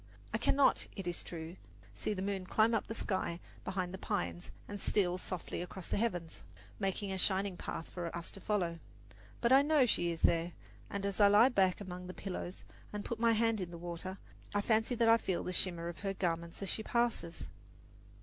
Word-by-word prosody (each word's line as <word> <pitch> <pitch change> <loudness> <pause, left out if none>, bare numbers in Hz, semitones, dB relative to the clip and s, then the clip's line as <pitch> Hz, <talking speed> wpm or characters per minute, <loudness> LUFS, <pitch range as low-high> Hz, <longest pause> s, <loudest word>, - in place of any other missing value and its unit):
I - - +1
cannot, 275 -1 +3
it 195 - -5
is 175 -1 -1
true, 165 +1 -7 0.4
see 215 - -2
the 185 - -3
moon 195 -2 -2
climb 220 +4 +4
up 225 - +1
the 225 - -4
sky 185 -5 -1 0.2
behind 185 -1 -2
the 190 - -6
pines 85 - -2 0.2
and 205 0 -5
steal 180 -3 +2
softly 185 -2 -4
across 180 0 -7
the - - +1
heavens, 180 -7 -1 0.4
making 195 0 -1
a 190 - -2
shining 195 0 +2
path 165 - -5
for 175 -2 -3
us 170 - -4
to 195 - -10
follow; 175 -5 0 0.6
but 235 +1 +4
I 270 - +9
know 295 -2 +4
she 175 -7 +2
is 165 -1 -4
there, 170 0 +3 0.4
and 200 0 -3
as 200 0 -1
I 205 - +8
lie 210 +5 +7
back 190 -7 +3
among 180 -2 -6
the 185 - -7
pillows 185 -2 -5 0.3
and 210 -1 -4
put 235 - -3
my 230 0 +5
hand 225 -1 +2
in 180 - -3
the 170 - -8
water, 175 +2 -5 0.4
I 205 - +3
fancy 220 +3 +2
that 230 -1 +3
I 225 0 +8
feel 190 -5 -1
the 180 - -3
shimmer 170 -2 +1
of 170 - -6
her 195 -1 -2
garments 170 0 -2
as 195 - -2
she - - -1
passes. 235 -7 -1
190 Hz, 205 wpm, -34 LUFS, 175-215 Hz, 0.6 s, I